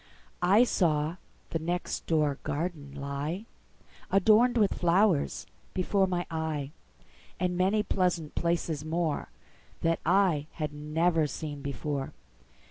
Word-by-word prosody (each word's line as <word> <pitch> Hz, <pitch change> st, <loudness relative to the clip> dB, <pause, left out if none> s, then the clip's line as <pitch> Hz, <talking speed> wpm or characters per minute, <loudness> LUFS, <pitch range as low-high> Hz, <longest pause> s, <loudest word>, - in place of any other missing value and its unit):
I 195 Hz, +6 st, +6 dB
saw 160 Hz, -7 st, +1 dB, 0.3 s
the 165 Hz, -, 0 dB
next 175 Hz, +3 st, -3 dB
door 150 Hz, -4 st, +1 dB
garden 145 Hz, -3 st, -4 dB
lie, 145 Hz, +8 st, -4 dB, 0.6 s
Adorned 220 Hz, +5 st, +5 dB
with 210 Hz, -3 st, +3 dB
flowers, 175 Hz, -2 st, +2 dB, 0.3 s
before 190 Hz, +1 st, +2 dB
my 175 Hz, -1 st, -1 dB
eye, 155 Hz, -3 st, -2 dB, 0.7 s
And 180 Hz, 0 st, 0 dB
many 195 Hz, +4 st, +2 dB
pleasant 180 Hz, -6 st, 0 dB
places 170 Hz, -3 st, -1 dB
moreThat 165 Hz, 0 st, -3 dB
I 175 Hz, -4 st, +3 dB
had 150 Hz, -2 st, -3 dB
never 155 Hz, +2 st, +1 dB
seen 145 Hz, +1 st, -6 dB
before. 140 Hz, 0 st, -3 dB
165 Hz, 110 wpm, -29 LUFS, 150-185 Hz, 0.7 s, I